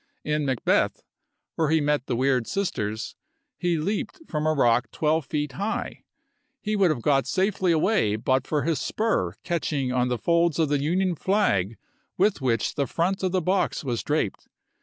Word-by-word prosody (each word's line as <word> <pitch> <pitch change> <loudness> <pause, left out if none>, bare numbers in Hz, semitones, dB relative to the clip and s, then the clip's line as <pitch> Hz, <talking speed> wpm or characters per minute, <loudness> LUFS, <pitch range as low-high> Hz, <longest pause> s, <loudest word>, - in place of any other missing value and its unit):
In 150 -1 -1
"Macbeth," 130 -3 +1 0.5
where 160 -2 0
he 160 +1 +3
met 145 -2 0
the 125 - 0
weird 130 -1 +1
sisters, 110 - -3 0.4
he 175 -2 0
leaped 200 - -2
from 150 0 -1
a 155 - +3
rock 125 -4 +2
twelve 155 -2 0
feet 150 -1 -2
high. 200 - -3 0.6
He 215 0 -2
would 195 -3 +4
have 130 -7 -1
got 135 -2 +2
safely 190 -1 +1
away 160 - +2
but 130 +4 0
for 150 -2 0
his 165 -1 0
spur 215 - 0
catching 150 -6 -1
in 125 0 +1
the 125 -1 -1
folds 170 +2 +2
of 160 -3 +2
the 145 -1 +1
Union 180 +5 +1
flag 130 - +1 0.4
with 195 -4 +2
which 115 -4 0
the 140 -2 -1
front 180 +8 -1
of 185 -1 0
the 185 -2 0
box 185 -1 0
was 120 -4 -2
draped. 150 -9 -2
150 Hz, 175 wpm, -25 LUFS, 130-180 Hz, 0.6 s, would